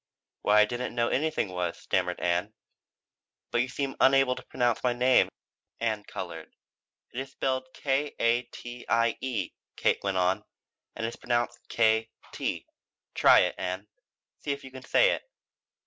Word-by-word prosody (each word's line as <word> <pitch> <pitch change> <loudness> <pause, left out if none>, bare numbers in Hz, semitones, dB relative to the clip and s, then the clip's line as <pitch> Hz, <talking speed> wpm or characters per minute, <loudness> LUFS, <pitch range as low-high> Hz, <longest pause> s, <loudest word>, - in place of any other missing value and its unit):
"Why 105 +1 +5
I - - +6
didn't 120 +2 -4
know 120 -1 +2
anything 155 -7 0
was," 90 -1 -2
stammered 90 -1 -1
Ann. 90 +4 0 1.0
"But 120 - +3
you 130 - 0
seem 135 +1 -3
unable 135 -1 +5
to - - -8
pronounce 120 -2 0
my 125 -1 +3
name." 125 +1 +4 0.5
Ann 110 -3 -1
colored. - - -7 0.6
"It 120 - -3
is 135 0 -5
spelled 130 -1 -1
K 140 +1 0
a 115 +1 +3
t 120 0 -10
i 115 -1 +3
e," 120 -8 -2 0.2
Kate - - +1
went 100 -1 0
on, 95 +3 +2 0.5
"and 115 - -3
is 115 - -4
pronounced 120 0 -1
K 110 0 +3 0.2
T. - - -3 0.5
Try - - +7
it, - - +1
Ann. 90 +2 -3 0.5
See - - -7
if 140 0 -4
you 130 - -10
can 130 0 -9
say - - +4
it." - - -1
120 Hz, 165 wpm, -28 LUFS, 105-130 Hz, 1.0 s, Try